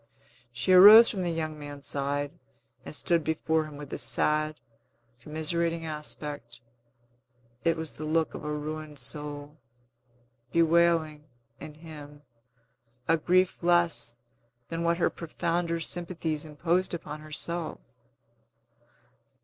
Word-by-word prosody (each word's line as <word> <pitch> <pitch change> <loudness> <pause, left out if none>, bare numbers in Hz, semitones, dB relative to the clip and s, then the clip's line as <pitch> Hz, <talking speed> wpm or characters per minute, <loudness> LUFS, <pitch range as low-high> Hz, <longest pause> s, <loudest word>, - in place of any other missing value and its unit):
She 125 +10 +1
arose 210 +5 +10
from 195 - -4
the 175 - -1
young 155 -2 -3
man's 145 -1 -9
side, 145 0 -1 0.5
and - - -7
stood 170 -2 +1
before 160 0 0
him 150 -2 -10
with 145 -1 -9
a - - -4
sad, 155 0 +1 0.6
commiserating 165 +4 -1
aspect; 150 -5 -5 1.0
it 165 0 +2
was 160 -2 -5
the 155 - -8
look 160 +1 0
of - - -8
a 150 - -3
ruined 150 0 -5
soul, 145 +2 -6 0.9
bewailing, 165 -2 +2 0.3
in 150 - -9
him, 150 -2 -12 0.8
a 165 - +4
grief 180 +3 +2
less 170 -8 +2 0.5
than 165 0 -3
what 170 0 +1
her 175 - +1
profounder 170 +1 -2
sympathies 165 -2 -2
imposed 170 +4 -1
upon 150 -2 -7
herself. 155 +2 -4
155 Hz, 115 wpm, -28 LUFS, 150-170 Hz, 1.0 s, arose